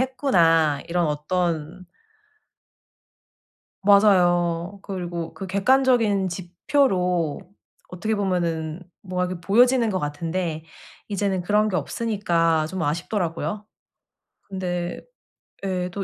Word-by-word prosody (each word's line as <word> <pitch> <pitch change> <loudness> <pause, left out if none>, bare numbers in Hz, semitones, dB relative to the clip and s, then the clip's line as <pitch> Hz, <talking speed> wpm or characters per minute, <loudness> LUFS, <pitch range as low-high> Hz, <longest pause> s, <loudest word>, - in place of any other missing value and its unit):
했구나.' 165 - +2
이런 170 -1 +1
어떤 165 +2 -2 2.0
맞아요. 180 -3 +3
그리고 175 -4 -5
그 195 - -7
객관적인 215 -1 +2
지표로 180 - 0 0.5
어떻게 215 +5 -2
보면은 170 -4 -1 0.2
뭐가 180 -1 -2
이렇게 180 -1 -6
보여지는 240 +5 +4
것 190 -3 -1
같은데 160 +2 -3 0.5
이제는 195 -2 -1
그런 210 +4 +2
게 195 - -1
없으니까 170 -8 0
좀 185 +1 -5
아쉽더라고요. 175 +5 -2 0.8
근데 180 -2 -4 0.7
예 180 -2 -2
또 200 - -3
180 Hz, 230 characters per minute, -23 LUFS, 170-200 Hz, 2.0 s, 보여지는